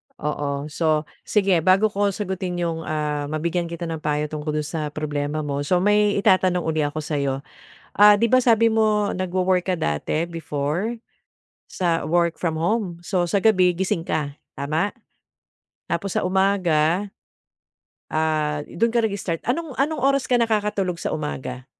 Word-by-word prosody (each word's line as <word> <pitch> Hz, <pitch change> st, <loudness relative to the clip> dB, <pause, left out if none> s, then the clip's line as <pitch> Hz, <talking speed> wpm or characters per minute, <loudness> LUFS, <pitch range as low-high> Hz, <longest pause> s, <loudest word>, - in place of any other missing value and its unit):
Oo. 145 Hz, -1 st, -3 dB
So, 155 Hz, -1 st, +1 dB, 0.2 s
sige 195 Hz, -5 st, +2 dB
bago 195 Hz, +5 st, +4 dB
ko 200 Hz, 0 st, +2 dB
sagutin 190 Hz, -2 st, -3 dB
yung, 165 Hz, -2 st, -2 dB
ah, 150 Hz, -2 st, -2 dB
mabigyan 170 Hz, +3 st, -1 dB
kita 170 Hz, 0 st, -5 dB
ng 165 Hz, -2 st, -4 dB
payo 150 Hz, 0 st, 0 dB
tungkol 150 Hz, 0 st, -5 dB
dun 150 Hz, -, -1 dB
sa 155 Hz, -1 st, -3 dB
problema 150 Hz, 0 st, -3 dB
mo, 140 Hz, 0 st, -2 dB
so 180 Hz, +5 st, +1 dB
may 205 Hz, +2 st, +3 dB
itatanong 185 Hz, -3 st, +3 dB
uli 160 Hz, -1 st, 0 dB
ako 145 Hz, +1 st, -2 dB
sa'yo. 140 Hz, -2 st, -2 dB, 0.5 s
Ah, 205 Hz, 0 st, +7 dB
'di 230 Hz, -, +2 dB
ba 255 Hz, -, +6 dB
sabi 230 Hz, -2 st, +4 dB
mo 215 Hz, -2 st, +2 dB
nagwo-work 185 Hz, 0 st, 0 dB
ka 185 Hz, -, +2 dB
dati, 75 Hz, -, -1 dB
before, 165 Hz, +6 st, -3 dB, 0.7 s
sa 170 Hz, -3 st, -1 dB
work 170 Hz, 0 st, +1 dB
from 165 Hz, -3 st, -1 dB
home? 180 Hz, -2 st, -1 dB
So, 175 Hz, 0 st, 0 dB
sa 195 Hz, +2 st, 0 dB
gabi 185 Hz, -5 st, +4 dB
gising 175 Hz, -2 st, -1 dB
ka, 145 Hz, -2 st, -2 dB, 0.2 s
tama? 155 Hz, +8 st, -1 dB, 1.0 s
Tapos 175 Hz, +3 st, -2 dB
sa -, -, +1 dB
umaga 185 Hz, -1 st, +2 dB, 1.0 s
Ah, 155 Hz, -1 st, 0 dB
i -, -, -10 dB
dun 230 Hz, -, +4 dB
ka 235 Hz, -, +3 dB
nag-start. 195 Hz, -6 st, -2 dB
Anong 295 Hz, +3 st, -2 dB
anong 295 Hz, +2 st, 0 dB
oras 275 Hz, 0 st, +1 dB
ka 245 Hz, -, +4 dB
nakakatulog 210 Hz, -5 st, 0 dB
sa 170 Hz, -, -4 dB
umaga? 130 Hz, -4 st, -5 dB
175 Hz, 155 wpm, -23 LUFS, 155-200 Hz, 1.0 s, Ah